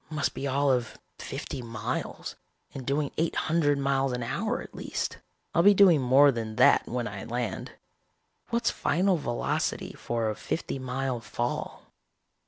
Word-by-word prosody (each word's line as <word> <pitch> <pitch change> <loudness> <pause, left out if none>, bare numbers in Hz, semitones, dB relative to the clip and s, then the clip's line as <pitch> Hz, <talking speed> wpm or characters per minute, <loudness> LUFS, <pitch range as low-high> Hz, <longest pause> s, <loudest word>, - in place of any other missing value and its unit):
Must 155 -2 -1
be 140 - -3
all 140 +1 +2
of 125 -3 -1 0.2
fifty 135 - -5
miles, 115 -3 -4 0.4
and 130 -2 -7
doing 140 +1 0
eight 165 +1 0
hundred 155 -3 +2
miles 135 -1 +1
an 125 -1 -2
hour 115 - -1
at - - -10
least. - - -4 0.3
I'll 170 - +4
be 200 +3 +7
doing 185 -7 +6
more 135 +3 +6
than 110 -3 -4
that - - +5
when 120 0 -2
I 100 -2 -6
land. 120 -3 -4 0.8
What's 235 0 +1
final 180 +5 +1
velocity 120 -6 -2
for 115 -2 -2
a - - -5
fifty 135 +3 -3
mile 130 -1 -2
fall? 120 +1 -4
135 Hz, 155 wpm, -28 LUFS, 120-145 Hz, 0.8 s, be